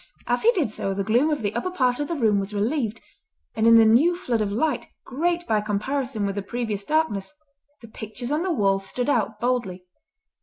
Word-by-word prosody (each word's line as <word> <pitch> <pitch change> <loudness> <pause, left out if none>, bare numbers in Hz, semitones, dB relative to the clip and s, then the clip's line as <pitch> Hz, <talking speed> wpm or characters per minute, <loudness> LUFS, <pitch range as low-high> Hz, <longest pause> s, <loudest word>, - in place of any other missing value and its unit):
As - - 0
he 460 - +5
did 310 - 0
so 195 -2 -3
the 195 - -1
gloom 240 +9 +2
of 295 -7 -1
the 205 0 -1
upper 240 +10 -2
part 255 -8 0
of 290 - -2
the 340 - -2
room 220 -7 +2
was 200 +1 -4
relieved, 225 +1 -1 0.5
and 220 0 +1
in 230 - +8
the 225 - +7
new 270 +11 +4
flood 245 -11 -1
of 205 -1 -1
light, 250 +3 -1 0.2
great 340 +6 -1
by 215 -2 +1
comparison 220 +2 -2
with 200 - -1
the 200 - -3
previous 215 -1 -3
darkness, 225 -10 0 0.5
the 230 - -11
pictures 220 +4 -7
on 300 +2 +1
the 370 0 -1
wall 195 -9 +2
stood 245 +7 -2
out 220 -4 0
boldly. 225 -7 -2
230 Hz, 215 wpm, -24 LUFS, 210-285 Hz, 0.5 s, in